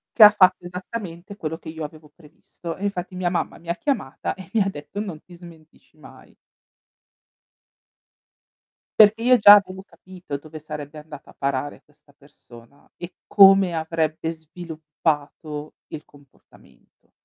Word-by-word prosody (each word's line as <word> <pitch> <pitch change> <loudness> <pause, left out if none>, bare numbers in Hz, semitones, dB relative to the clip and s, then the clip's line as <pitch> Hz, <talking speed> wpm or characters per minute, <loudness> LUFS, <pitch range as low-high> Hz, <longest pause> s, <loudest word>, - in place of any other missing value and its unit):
Che 225 - +8
ha 210 - +12
fatto 185 -3 +3
esattamente 180 0 -8
quello 160 -3 -5
che 165 - -11
io 160 0 -7
avevo 155 0 -13
previsto, 165 +1 -10
e 195 - -10
infatti 185 -2 -4
mia 180 -1 -1
mamma 175 - -3
mi 170 - -14
ha 170 - 0
chiamata 265 - -3
e 190 -3 -13
mi 225 - +2
ha 195 - +1
detto: 170 +3 -8
"Non 185 -7 -6
ti 180 - -16
smentisci 165 -3 -17
mai". - - -17 2.6
Perché 215 +1 +6
io 250 0 +5
già 205 -1 +10
avevo 190 -2 -1
capito 185 -5 -10
dove 155 +2 -11
sarebbe 150 -1 -8
andata 150 -2 -13
a - - -15
parare 140 +1 -3
questa 150 -1 -28
persona, 140 -3 -19
e 175 +1 -9
come 195 -3 +6
avrebbe 160 0 -2
sviluppato 155 -2 -5
il 150 - -9
comportamento. 140 -2 -24
165 Hz, 145 wpm, -22 LUFS, 150-185 Hz, 2.6 s, ha